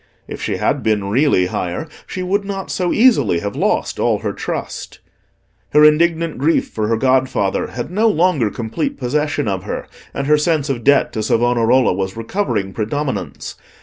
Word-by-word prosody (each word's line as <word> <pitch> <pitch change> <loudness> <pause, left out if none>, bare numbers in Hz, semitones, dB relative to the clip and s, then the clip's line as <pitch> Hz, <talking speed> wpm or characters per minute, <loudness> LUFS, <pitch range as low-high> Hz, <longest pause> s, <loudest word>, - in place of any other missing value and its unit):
If - - -7
she - - -2
had - - 0
been 105 -3 0
really 130 -6 +3
higher, 90 - -3 0.2
she 185 - -4
would 200 +3 0
not 195 -1 -5
so 180 -2 -1
easily 215 - +4
have 100 0 -4
lost - - 0
all 115 -3 +2
her 100 - -1
trust. - - -5 0.8
Her 150 +1 +7
indignant 165 0 +2
grief 160 +4 +2
for 110 -1 -2
her 115 0 +1
godfather 130 -5 +1
had 120 +6 -6
no 215 +5 +2
longer 165 - +2
complete 115 +9 -3
possession 145 +1 -1
of 95 -2 -1
her, - - -4 0.3
and 140 - -3
her 150 +1 +4
sense 150 -2 +1
of 120 -3 -4
debt 140 +2 +3
to 110 - -2
Savonarola 120 +2 +2
was 95 +2 -3
recovering 115 - -2
predominance. 130 +7 -3
130 Hz, 170 wpm, -18 LUFS, 110-160 Hz, 0.8 s, Her